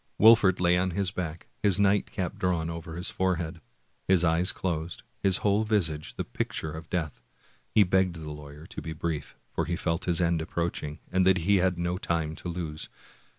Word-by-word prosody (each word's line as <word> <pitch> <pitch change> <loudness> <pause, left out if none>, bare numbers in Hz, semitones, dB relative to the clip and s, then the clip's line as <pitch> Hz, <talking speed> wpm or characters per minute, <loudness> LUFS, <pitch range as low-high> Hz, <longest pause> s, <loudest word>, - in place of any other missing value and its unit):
Wolfert 110 -4 +7
lay 90 0 +4
on 95 +1 +1
his 95 -3 +1
back, 85 -3 -5 0.2
his 100 -2 +4
nightcap 100 -2 +1
drawn 85 -3 0
over 80 0 -7
his 90 +2 -3
forehead, 90 -3 -1 0.5
his 95 -2 +5
eyes 85 +2 +2
closed, 85 -2 -3 0.2
his 95 -1 +3
whole 105 +1 +3
visage 85 -9 0
the - - -2
picture 75 +5 -3
of 80 +1 -8
death. 75 -8 -3 0.5
He 105 - +5
begged 95 -1 +2
the 80 -2 -7
lawyer 75 +1 -10
to - - -7
be 80 - -5
brief, 80 -1 -4 0.2
for - - 0
he 85 - -1
felt 80 -2 -1
his 85 -2 +3
end 85 -2 +2
approaching, 80 -2 -3
and 95 0 +3
that 95 -1 +5
he 100 +1 +5
had 90 -1 +2
no 85 +1 -1
time 80 -4 -1
to 90 - -6
lose. 80 -3 -5
85 Hz, 190 wpm, -28 LUFS, 80-95 Hz, 0.5 s, Wolfert